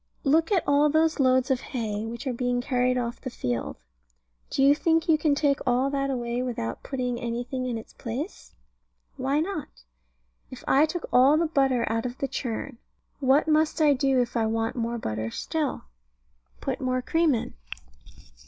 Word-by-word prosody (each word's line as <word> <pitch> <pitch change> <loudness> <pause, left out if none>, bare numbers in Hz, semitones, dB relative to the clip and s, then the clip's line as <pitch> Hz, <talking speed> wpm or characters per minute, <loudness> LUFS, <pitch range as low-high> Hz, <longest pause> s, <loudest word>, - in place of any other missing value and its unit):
Look 320 +5 +3
at 375 -5 +2
all 285 +1 +4
those 315 +1 +2
loads 260 -1 +3
of 260 -1 +1
hay, 220 -5 -3
which 235 +4 -7
are 260 - -1
being 245 0 0
carried 250 0 +1
off 240 -1 -3
the 260 - -4
field. 120 - -3 0.7
Do 270 - +1
you 280 +1 +7
think 325 +2 +1
you 320 - +5
can 300 -1 +2
take 285 -1 +2
all 255 +3 +1
that 275 -1 -1
away 240 -2 -2
without 230 - -3
putting 250 -3 -3
anything 245 +2 -3
in 240 -2 -2
its 225 - -10
place? 265 - -6 0.6
Why 275 +2 0
not? 320 -3 -3 0.8
If - - -10
I 290 +4 +5
took 345 +2 -4
all 265 +4 +6
the 335 - +2
butter 270 -6 +2
out 225 +2 -1
of 245 +1 -8
the 275 - -2
churn, 240 0 -4 0.4
what 275 +2 +3
must 310 +1 +2
I 300 -2 +5
do 270 -1 +2
if 245 -1 -1
I 225 -2 +2
want 225 0 -1
more 235 -1 -2
butter 110 - -3
still? 300 - -3 0.8
Put - - -3
more 255 -1 0
cream 325 -2 +2
in. 225 - -4
260 Hz, 180 wpm, -26 LUFS, 240-290 Hz, 0.8 s, you